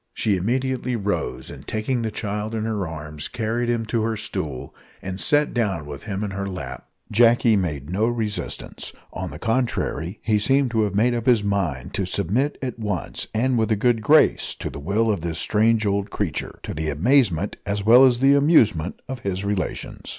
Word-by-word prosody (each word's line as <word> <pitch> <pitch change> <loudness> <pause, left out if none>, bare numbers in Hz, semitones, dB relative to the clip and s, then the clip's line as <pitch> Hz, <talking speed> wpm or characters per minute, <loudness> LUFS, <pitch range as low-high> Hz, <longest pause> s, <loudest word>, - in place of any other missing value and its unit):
She 105 -3 +1
immediately 125 +5 -1
rose, 105 -2 -3
and - - -11
taking 115 +3 -1
the 110 - -1
child 105 +1 -4
in 110 - -2
her 105 -5 -2
arms 75 -2 -6
carried 120 +1 -2
him 115 -1 0
to 115 +1 -1
her 110 0 -1
stool, 65 -10 -3 0.3
and 95 0 -6
sat 145 0 +3
down 100 - -1
with 75 +2 -8
him 100 -1 -3
in 105 - -3
her 100 0 -3
lap. 70 -9 -7 0.2
Jacky 115 +1 +5
made 75 -6 -2
no 105 +5 +1
resistance; 110 -3 -3 0.2
on - - -4
the - - -8
contrary, 115 - -1
he 110 -2 +2
seemed 135 +3 +2
to 110 -2 +2
have 100 -1 -3
made 120 +4 +3
up 120 0 -3
his 120 -4 +4
mind 95 -11 -2
to 95 - -1
submit 100 - 0
at 125 -2 -4
once, 105 -6 -3
and 125 +2 +1
with 110 0 +1
a - - +4
good 115 +2 +2
grace, 155 +8 +4
to - - -5
the - - -8
will 105 +9 +1
of 100 - -2
this 85 -1 -3
strange 110 +4 +2
old 100 0 0
creature 100 -7 -3
to - - -5
the 80 0 -2
amazement 100 - +2
as 100 0 -2
well 120 +4 +8
as 125 -1 +4
amusement 135 - +4
of 130 -1 -5
his 100 -2 -3
relations. 100 -2 -3
105 Hz, 195 wpm, -23 LUFS, 95-120 Hz, 0.3 s, well